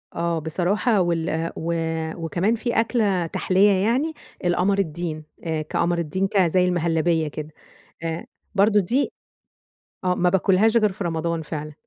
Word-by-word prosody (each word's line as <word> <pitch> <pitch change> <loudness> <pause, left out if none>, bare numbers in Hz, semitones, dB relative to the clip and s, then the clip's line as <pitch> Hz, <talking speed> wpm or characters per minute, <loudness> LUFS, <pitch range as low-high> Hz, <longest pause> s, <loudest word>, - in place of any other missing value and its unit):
آه، 170 -1 0
بصراحة 190 - +1
وال 165 -1 -1
و 170 +1 -2 0.5
وكمان 190 +7 +1
في 235 0 0
أكلة 210 -6 +1
تحلية 190 +4 +3
يعني 235 +12 +1 0.3
القمر 185 +3 +2
الدين، 160 -3 -3 0.2
كقمر 160 +2 0
الدين 170 +4 -1
ك 200 - -2
زي 180 0 +4
المهلبية 165 -2 +1
كده. 150 +1 -6 0.5
آآ 165 0 -3 0.3
برضو 205 +1 +4
دي 240 +9 +1 0.9
آه، 180 0 +2
ما 180 0 +2
باكلهاش 195 +4 +3
غير 215 -3 +3
في 195 +1 -6
رمضان 165 0 -1
فعلًا. 150 -1 -6
175 Hz, 135 wpm, -23 LUFS, 165-200 Hz, 0.9 s, زي